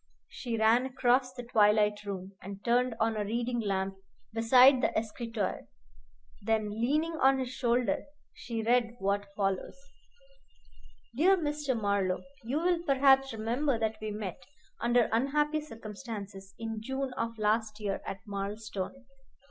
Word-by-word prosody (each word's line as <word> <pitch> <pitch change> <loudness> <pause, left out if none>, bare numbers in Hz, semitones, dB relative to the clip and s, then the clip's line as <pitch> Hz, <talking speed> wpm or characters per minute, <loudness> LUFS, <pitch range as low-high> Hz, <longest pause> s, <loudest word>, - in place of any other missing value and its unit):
She 235 -3 -4
ran 225 +4 +4
across 255 0 +2
the 250 -1 -8
twilight 210 -2 +3
room, 195 -1 -5
and 195 +1 -9
turned 245 0 +2
on 225 0 +1
a 210 - -1
reading 235 +3 -1
lamp 195 -2 -1 0.4
beside 250 +3 +6
the - - +3
escritoire. 225 -2 -3 0.7
Then, 215 0 0
leaning 300 +9 0
on 270 -2 +4
his 255 -1 -3
shoulder, 245 -1 0 0.3
she 230 -2 -5
read 235 0 +2
what 200 0 -1
follows: 195 +3 -1 1.4
Dear 370 +8 +5
Mr. 295 -6 -1
Marlowe: 200 -3 0 0.2
You 245 +6 -2
will 350 0 +2
perhaps 270 -3 +4
remember 235 +5 0
that 220 -1 -1
we 215 - -3
met, 205 -3 -5 0.4
under 240 0 +3
unhappy 295 +6 +1
circumstances, 210 -6 -8
in 225 -1 -5
June 265 +2 -3
of 230 -1 -3
last 215 0 0
year 200 -2 -2
at 195 - -6
Marlstone. 205 +4 -5
230 Hz, 135 wpm, -30 LUFS, 210-255 Hz, 1.4 s, beside